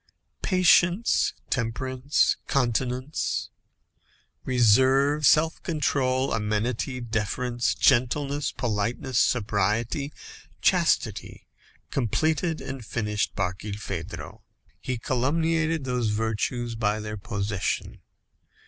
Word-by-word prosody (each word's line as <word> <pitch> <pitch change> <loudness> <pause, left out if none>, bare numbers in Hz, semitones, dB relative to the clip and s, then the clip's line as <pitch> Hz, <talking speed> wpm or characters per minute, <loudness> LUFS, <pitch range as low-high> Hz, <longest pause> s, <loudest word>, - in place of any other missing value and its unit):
Patience, 185 +2 +3 0.2
temperance, 130 +3 0
continence, 125 +2 -1 0.9
reserve, 130 +4 +4
self 160 +2 +3
control, 135 -5 0
amenity, 110 +4 -1
deference, 120 +1 -1
gentleness, 140 +3 +2
politeness, 120 +2 -1
sobriety, 115 +5 0 0.5
chastity, - - +1 0.5
completed 155 - 0
and 135 -1 -6
finished 105 -1 -2
Barkilphedro. 100 -2 -5 0.4
He 130 -1 -3
culumniated 160 +6 0
those 125 -3 -1
virtues 115 +2 -1
by 110 -1 0
their 105 0 -5
possession. 100 -1 -3
125 Hz, 75 wpm, -26 LUFS, 110-140 Hz, 0.9 s, reserve